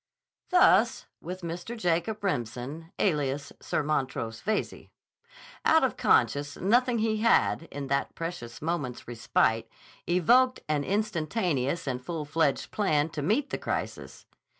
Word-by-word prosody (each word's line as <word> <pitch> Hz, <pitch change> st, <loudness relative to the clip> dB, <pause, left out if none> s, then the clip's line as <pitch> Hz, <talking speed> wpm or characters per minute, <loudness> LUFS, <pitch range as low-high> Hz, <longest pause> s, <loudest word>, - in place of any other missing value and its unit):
Thus 360 Hz, -1 st, +4 dB, 0.2 s
with 185 Hz, +1 st, -6 dB
Mr. 175 Hz, +7 st, -5 dB
Jacob 195 Hz, +3 st, -1 dB
Remsen 140 Hz, -, -3 dB
alias 145 Hz, -5 st, 0 dB
Sir -, -, -1 dB
Montrose 130 Hz, -6 st, -2 dB
Veyze. 215 Hz, 0 st, -2 dB, 0.7 s
Out 320 Hz, -1 st, +5 dB
of 265 Hz, -, +1 dB
conscious 145 Hz, +5 st, +2 dB
nothing 240 Hz, +5 st, +2 dB
he 220 Hz, 0 st, +1 dB
had, 215 Hz, -6 st, +2 dB
in 140 Hz, 0 st, -5 dB
that 140 Hz, 0 st, -1 dB
precious 165 Hz, -8 st, -6 dB
moment's 150 Hz, -7 st, -3 dB
respite, 115 Hz, -1 st, +1 dB, 0.4 s
evoked 245 Hz, +9 st, +4 dB
an 150 Hz, -2 st, 0 dB
instantaneous 170 Hz, -, -1 dB
and 125 Hz, -2 st, -3 dB
full 160 Hz, 0 st, -4 dB
fledged 155 Hz, -1 st, 0 dB
plan 155 Hz, -7 st, +1 dB
to 155 Hz, -, -5 dB
meet 220 Hz, -, 0 dB
the -, -, -2 dB
crisis. -, -, -4 dB
165 Hz, 125 wpm, -28 LUFS, 140-205 Hz, 0.7 s, Out